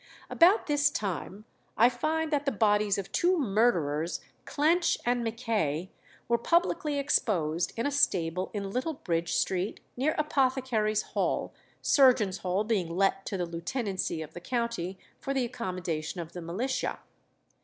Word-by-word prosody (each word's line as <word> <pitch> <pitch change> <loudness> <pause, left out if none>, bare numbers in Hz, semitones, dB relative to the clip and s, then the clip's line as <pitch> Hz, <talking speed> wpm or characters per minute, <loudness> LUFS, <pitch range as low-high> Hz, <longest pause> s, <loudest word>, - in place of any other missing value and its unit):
About 365 +6 +5
this 290 -1 +3
time 200 - -4 0.3
I 235 - +7
find 310 +6 -1
that 290 0 +1
the - - +3
bodies 210 -2 +2
of 195 -2 -5
two 360 +1 +2
murderers, 185 - +1 0.3
Clench 330 +4 +2
and 245 0 +1
Mackay, 220 - -1 0.4
"were 235 0 +2
publicly 330 -1 +1
exposed 180 - +1
in 230 - -1
a 285 - +1
stable 185 - +1
in 200 -2 -4
Little 260 +8 -2
Bridge 170 -7 -2
Street, 185 +1 -1 0.2
near 280 +5 0
Apothecaries' 255 -7 +1
Hall, - - -1 0.3
Surgeons' 245 -9 +4
Hall 185 +2 0
being 205 -6 0
let 195 +2 +1
to 195 - -2
the 180 - -1
lieutenancy 175 -1 -3
of 160 +1 -12
the 175 - -8
county 235 -5 -2 0.2
for 275 - -3
the 260 -2 +1
accommodation 180 -9 -4
of 165 -1 -6
the 175 - -6
militia." 225 +11 -2
215 Hz, 145 wpm, -29 LUFS, 180-265 Hz, 0.4 s, I